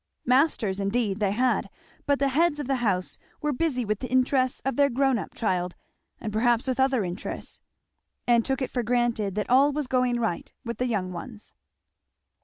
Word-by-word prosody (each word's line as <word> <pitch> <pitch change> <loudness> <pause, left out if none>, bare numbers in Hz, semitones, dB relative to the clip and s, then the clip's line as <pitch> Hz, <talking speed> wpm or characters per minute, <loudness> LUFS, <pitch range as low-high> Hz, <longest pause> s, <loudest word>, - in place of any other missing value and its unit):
Masters 250 -7 +2
indeed 200 0 0
they 205 -2 +2
had; 245 +6 +1 0.4
but 285 -1 +3
the 275 0 +1
heads 300 +2 +2
of 290 - -3
the 270 +1 0
house 195 -7 -1 0.2
were 300 -1 -1
busy 260 -4 0
with 215 -1 -1
the 255 - -5
interests 255 0 +2
of 270 - 0
their 280 +1 +4
grown 265 -1 +2
up - - -8
child, 180 -5 -1 0.4
and 215 -2 -5
perhaps 235 +1 +2
with 260 -1 -2
other 265 -4 +3
interests; 180 +2 -6 0.6
and 235 -1 +4
took 265 +2 -1
it - - -4
for 245 - 0
granted 235 -4 0
that 210 - -1
all 270 +4 +5
was 295 0 -2
going 250 -1 +1
right 220 -7 -2
with 235 -2 -5
the 250 - +1
young 190 -6 -2
ones. 215 +4 -9
245 Hz, 190 wpm, -26 LUFS, 215-265 Hz, 0.6 s, all